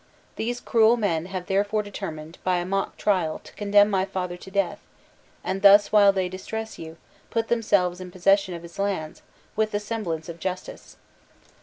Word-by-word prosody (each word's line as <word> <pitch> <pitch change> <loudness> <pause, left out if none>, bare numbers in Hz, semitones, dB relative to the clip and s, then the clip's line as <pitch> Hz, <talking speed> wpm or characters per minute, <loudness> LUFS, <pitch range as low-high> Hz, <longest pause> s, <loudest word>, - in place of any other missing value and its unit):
These 240 +2 -3
cruel 230 +1 +4
men 175 -6 -1
have 185 -1 -5
therefore 205 +3 0
determined, 160 -5 -7
by 185 -1 +2
a 175 - -2
mock 195 +1 -2
trial, 180 -6 +1
to - - -14
condemn 205 0 +4
my 190 -1 +2
father 185 -2 -4
to 180 - -12
death, 200 +1 -1 0.6
and 190 +1 -2
thus, 205 0 +7
while 205 -2 +7
they 190 -2 -1
distress 220 +4 -6
you, 160 0 -9 0.3
put 225 -1 -1
themselves 200 -6 +1
in 185 - -7
possession 190 +1 +2
of 170 - -9
his 170 +3 -12
lands, 190 -6 -2 0.3
with 215 0 +1
the 205 - -1
semblance 205 -7 -4
of 170 -1 -8
justice. 185 +1 -6
195 Hz, 175 wpm, -25 LUFS, 180-205 Hz, 0.6 s, thus